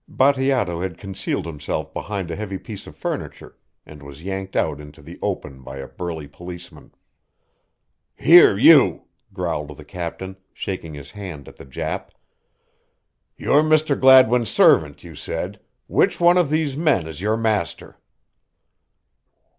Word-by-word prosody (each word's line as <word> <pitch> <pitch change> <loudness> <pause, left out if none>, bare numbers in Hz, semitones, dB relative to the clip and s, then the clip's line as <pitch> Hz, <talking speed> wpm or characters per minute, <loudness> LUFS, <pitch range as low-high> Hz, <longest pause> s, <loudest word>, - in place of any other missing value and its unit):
Bateato 130 -10 +1
had 90 -3 -4
concealed 95 0 -4
himself 75 -3 -5
behind 95 -4 -4
a - - -3
heavy 100 -2 -5
piece 105 +1 -10
of - - -12
furniture - - -6 0.3
and 75 -1 -13
was 70 +2 -12
yanked 95 0 -5
out 75 -2 0
into 75 +1 -14
the 80 +4 -12
open 65 -2 -4
by 65 +1 -9
a 70 0 -7
burly 80 -4 -6
policeman. 85 +3 -11 1.2
"Here 165 - +7
you," 145 +5 +6 0.3
growled 75 -5 -4
the 75 - -12
captain, 90 +3 -6 0.2
shaking 85 -5 -5
his 70 -1 -10
hand 90 -9 -9
at - - -14
the - - -13
Jap, 65 - -5 1.3
"you're 145 - +3
Mr. 155 -1 +2
Gladwin's 130 -4 +6
servant, 75 -2 +3
you 85 -2 -11
said - - -5 0.3
which - - +1
one 175 +1 +5
of 170 -5 +1
these 155 -3 0
men 150 - +1
is 80 +1 -8
your 110 +2 0
master?" 110 -7 -2
95 Hz, 140 wpm, -21 LUFS, 75-125 Hz, 1.3 s, Here